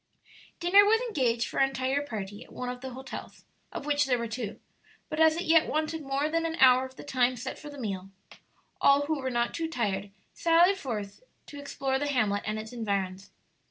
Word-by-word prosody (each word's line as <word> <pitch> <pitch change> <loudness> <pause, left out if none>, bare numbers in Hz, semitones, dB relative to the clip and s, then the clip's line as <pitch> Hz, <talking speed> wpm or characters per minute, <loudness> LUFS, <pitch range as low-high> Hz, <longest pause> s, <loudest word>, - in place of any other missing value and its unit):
Dinner 360 +4 +6
was 440 +2 +4
engaged 255 - 0
for - - -4
our 270 - +6
entire 265 +1 -1
party 205 -7 -6
at - - -20
one 250 - -5
of 250 0 -6
the 265 - -5
hotels, 265 +1 -9 0.3
of - - -6
which 290 0 +2
there 250 -2 +2
were 235 0 -3
two; 225 -2 -5 0.5
but 310 - -4
as 320 0 +6
it 345 - -2
yet 325 -1 +4
wanted 310 +1 -1
more 275 +1 -1
than 330 +1 0
an 325 0 -2
hour 255 0 +6
of 260 - -19
the - - -10
time 255 -2 +1
set 245 - -6
for 300 - -9
the 290 - -10
meal, 195 -6 -4 0.7
all 280 +1 +6
who 310 0 -1
were 260 - -2
not 240 -1 0
too 330 -1 -2
tired 205 -8 -2 0.2
sallied 340 +4 +4
forth 210 - -5 0.2
to 290 - -10
explore 270 -1 -2
the 290 - -1
hamlet 215 -7 +1
and 215 0 -1
its 220 +2 -7
environs. 200 -4 -3
265 Hz, 210 wpm, -28 LUFS, 230-305 Hz, 0.7 s, Dinner